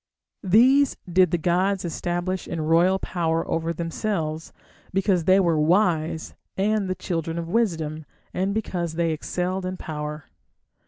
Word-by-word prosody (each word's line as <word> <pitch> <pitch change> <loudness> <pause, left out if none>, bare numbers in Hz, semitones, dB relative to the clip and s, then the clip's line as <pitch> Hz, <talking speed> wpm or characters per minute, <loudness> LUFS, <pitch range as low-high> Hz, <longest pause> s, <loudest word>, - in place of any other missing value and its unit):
These 255 +8 +4
did 180 0 +4
the 175 - +1
gods 180 +3 +1
establish 175 +2 -3
in 170 - -4
royal 170 +4 +3
power 165 -3 -1
over 165 0 -1
themselves, 165 -1 -3 0.4
because 190 -3 +1
they 190 +2 +5
were 170 -4 +2
wise 160 -1 +1 0.2
and 205 0 +1
the 185 - -1
children 165 -3 -3
of 170 -1 -3
wisdom, 165 -7 -1 0.3
and 190 +2 0
because 180 -6 -2
they 165 -1 +1
excelled 180 +4 -2
in 185 0 -4
power. 150 -2 -6
175 Hz, 140 wpm, -24 LUFS, 165-190 Hz, 0.4 s, they